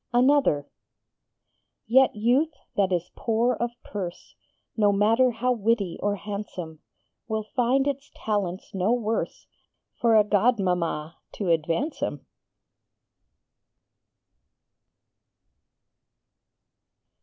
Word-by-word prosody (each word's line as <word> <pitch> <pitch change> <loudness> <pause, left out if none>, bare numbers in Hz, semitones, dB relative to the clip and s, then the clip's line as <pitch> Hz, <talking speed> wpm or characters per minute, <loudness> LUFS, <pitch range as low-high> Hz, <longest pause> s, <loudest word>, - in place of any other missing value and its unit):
_ 240 - +4
ANOTHER 255 - +3 1.2
Yet 260 +2 +4
youth 255 +9 +2 0.2
that 195 -2 +2
is 175 -1 -1
poor 235 +2 +1
of 240 - -2
purse, 185 -4 -6 0.4
No 210 -2 +4
matter 225 +5 +4
how 245 +2 0
witty 220 -5 0
or 205 0 +1
handsome, 190 -5 -6 0.5
Will 220 -1 -2
find 250 +4 +1
its 280 0 -3
talents 200 -4 -3
no 190 +3 +1
worse 225 -2 -2 0.6
_For 230 -2 +5
a - - +5
godmamma 185 -7 0 0.2
to 195 -4 -3
advance 165 - 0
'em. - - -3
215 Hz, 95 wpm, -26 LUFS, 190-245 Hz, 1.2 s, For